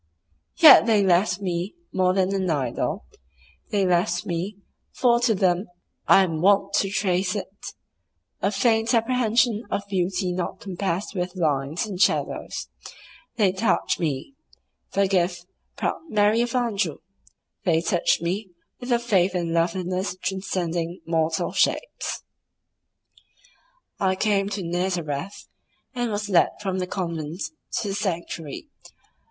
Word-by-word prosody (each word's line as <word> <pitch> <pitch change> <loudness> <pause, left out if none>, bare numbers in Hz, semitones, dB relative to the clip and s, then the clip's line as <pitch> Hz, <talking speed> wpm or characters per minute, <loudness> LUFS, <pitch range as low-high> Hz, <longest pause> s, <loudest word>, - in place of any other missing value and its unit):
Yet 315 -6 +9
they 215 -3 +4
left 190 +2 +2
me 180 - -3 0.2
more 185 0 +2
than 190 0 +1
an 190 -2 -1
idol; 135 -7 -1 0.6
they 200 -2 +1
left 175 0 +1
me 180 +4 -3 0.3
(for 240 -2 +3
to 240 -2 +2
them 185 +1 +1 0.4
I 195 - +7
am 165 -4 -2
wont 200 +2 +3
to 195 - +1
trace 190 -1 0
it) 200 -1 -7 0.7
a - - +2
faint 225 +3 +2
apprehension 230 -1 +2
of 200 - -2
beauty 185 -1 -1
not 185 +1 -3
compassed 190 0 -3
with 180 -1 -3
lines 150 -1 0
and 195 -3 -5
shadows; - - 0 0.7
they 205 -5 +3
touched 195 +3 0
me 155 - -2 0.6
(forgive, 185 -3 +1 0.3
proud - - -2
Marie 210 +1 +3
of 240 +1 -2
Anjou!)—they 195 - -2
touched 170 0 +1
me 190 +4 -2 0.3
with 245 0 -5
a 240 - +5
faith 195 -6 +1
in 170 -2 -1
loveliness 180 +2 -1
transcending 180 -3 -3
mortal 160 -1 0
shapes. - - -1 1.8
I 190 -1 +2
came 200 0 +1
to 205 -2 -4
Nazareth, 175 -1 -3 0.5
and 245 -2 -1
was 210 0 -2
led 185 -4 +4
from 190 -2 -2
the 180 - -2
convent 170 -3 -4 0.4
to 210 - -3
the - - -2
sanctuary. 170 - -4
190 Hz, 125 wpm, -24 LUFS, 175-205 Hz, 1.8 s, Yet